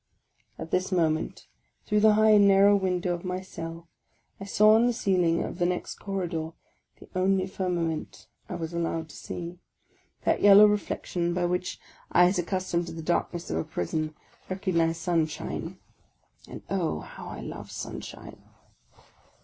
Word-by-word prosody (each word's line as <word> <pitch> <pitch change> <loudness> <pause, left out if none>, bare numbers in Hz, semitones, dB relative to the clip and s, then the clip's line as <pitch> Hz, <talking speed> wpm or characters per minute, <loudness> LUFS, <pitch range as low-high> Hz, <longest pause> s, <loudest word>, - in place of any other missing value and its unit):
At 160 0 -7
this 185 +2 0
moment, 160 -3 0 0.4
through 210 - +2
the 215 0 +6
high 215 0 +5
and 205 -1 +7
narrow 200 +1 +6
window 180 -2 0
of 175 - -5
my 185 0 -3
cell, 165 -2 -8 0.5
I 195 - -7
saw 215 +2 +5
on 230 +2 +5
the 245 - +1
ceiling 180 -7 +1
of 175 - -6
the 175 - +2
next 180 0 -3
corridor 175 -5 -3 0.5
(the - - -14
only 185 0 +2
fir 190 -1 -3
nament 160 - -3 0.2
I - - -4
was 165 0 -5
allowed 165 -1 -2
to - - -12
see) 175 0 -7 0.6
that - - +1
yellow 205 +1 +9
reflection 180 -4 -1
by 180 -1 +1
which 180 +1 -2 0.3
eyes 180 +1 +4
accustomed 175 -1 -1
to 165 - -6
the 165 0 -7
darkness 175 +1 -1
of 80 - 0
a 80 - 0
prison 155 - -3 0.3
recognize 170 -4 0
sunshine. 165 -3 -2 0.7
And - - -9
oh, 175 - -1
how - - -10
I - - -7
love - - -8
sunshine - - -8
180 Hz, 155 wpm, -27 LUFS, 165-195 Hz, 0.7 s, yellow